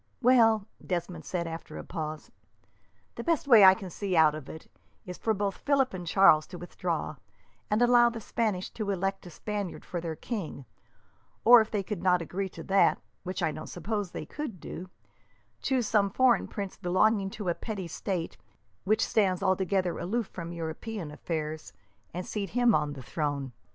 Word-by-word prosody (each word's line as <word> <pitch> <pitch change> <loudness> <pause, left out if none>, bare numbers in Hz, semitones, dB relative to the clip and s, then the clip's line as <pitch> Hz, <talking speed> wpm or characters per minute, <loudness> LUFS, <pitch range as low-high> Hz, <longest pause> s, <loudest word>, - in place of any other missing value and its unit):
"Well," 225 -4 +5 0.2
Desmond 175 -3 -3
said, 175 -2 -2
after 165 0 -7
a - - -6
pause; 155 -3 -6 0.8
"the - - -6
best 330 -4 0
way 230 -6 +8
I 190 0 +9
can 190 -4 -8
see 195 +1 -2
out 155 -2 +6
of 155 -3 -8
it 160 - -9 0.4
is 180 -1 -8
for 225 - 0
both 200 -2 -1
Philip 275 -4 +1
and 180 -2 -6
Charles 165 -4 +5
to 180 - -9
withdraw, 170 -3 -3 0.5
and 215 +3 +3
allow 240 0 +6
the 235 -1 -6
Spanish 210 -4 -2
to 215 -3 -4
elect 195 0 -2
a - - -8
Spaniard 205 +2 -5
for 175 - -4
their 165 -1 -4
king; 160 - -5 0.8
or, 240 0 +10
if 220 - -3
they 205 -2 -1
could 190 -2 -4
not 180 -1 +4
agree 190 +4 -3
to - - -9
that, 195 0 +3 0.2
which 185 0 -4
I 160 - +2
don't 155 - -7
suppose 205 +1 -3
they 155 - -6
could 250 - -6
do, 180 +3 -8 0.7
choose 260 -3 +1
some 205 -2 +2
foreign 245 +1 +3
prince 200 -2 -5
belonging 195 +2 +2
to 205 -4 -2
a - - +2
petty 195 -2 -5
state 170 +1 -4 0.5
which 215 +3 +3
stands 195 -5 +1
altogether 190 -1 +1
aloof 220 +7 -1
from 170 -2 -6
European 170 +2 -5
affairs, 155 0 -4 0.4
and 180 +2 -5
seat 200 -2 -3
him 245 -2 +5
on 150 -3 +1
the 135 -2 -9
throne. 145 -1 -2
190 Hz, 180 wpm, -29 LUFS, 170-215 Hz, 0.8 s, or